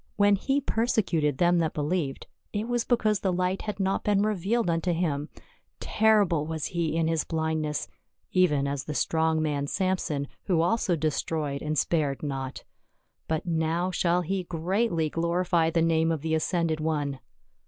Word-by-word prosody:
When 205 0 +4
he 270 +8 0
persecuted 200 - 0
them 175 +1 +3
that 160 -2 -1
believed, 150 -2 -2 0.3
it 210 +2 -2
was 240 -1 0
because 215 -4 +1
the 190 - 0
light 180 +1 0
had 210 -2 -5
not 195 0 0
been 205 -1 +2
revealed 215 +2 0
unto 170 +1 +1
him; 155 -3 -1 0.5
terrible 205 -8 +2
was 160 -2 -3
he 170 -3 -1
in 165 -1 +2
his 165 -1 +1
blindness 160 -2 -2 0.4
even 150 -7 +3
as 140 -2 -3
the 150 - -5
strong 160 +3 +1
man 145 -2 -1
Samson, 180 -6 -1 0.2
who 175 -4 +2
also 180 0 +1
destroyed 150 -2 -2
and 155 0 -2
spared 145 -4 0
not, 135 -2 -4 0.6
but 160 +1 -1
now 165 +2 0
shall 180 0 +1
he 190 +3 -1
greatly 175 0 0
glorify 170 +1 +1
the 165 0 +1
name 165 0 +2
of 160 -3 -2
the 160 +1 -2
ascended 160 0 0
One." 145 -3 -1
165 Hz, 160 wpm, -27 LUFS, 155-185 Hz, 0.6 s, When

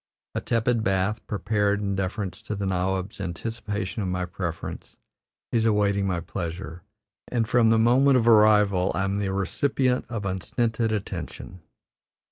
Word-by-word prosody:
A - - -2
tepid 115 0 +1
bath, 95 +3 0
prepared 105 -1 0
in 100 -1 -1
deference 95 0 -3
to 105 - -4
the 100 0 -3
nawab's 95 +2 -1
anticipation 105 +3 -4
of 95 - -1
my 90 0 -1
preference, 85 -1 -6 0.6
is 115 -2 +2
awaiting 100 -2 +2
my 90 -2 0
pleasure, 85 0 -6 0.5
and 115 -3 0
from 120 -1 +4
the 115 - +4
moment 130 +4 +5
of 120 -2 +1
arrival 105 -4 +5
I 95 - 0
am 100 +1 -1
the 100 -2 -1
recipient 125 +6 0
of 115 -4 -4
unstinted 110 +4 -1
attention. 95 -3 -5
100 Hz, 145 wpm, -25 LUFS, 95-115 Hz, 0.6 s, moment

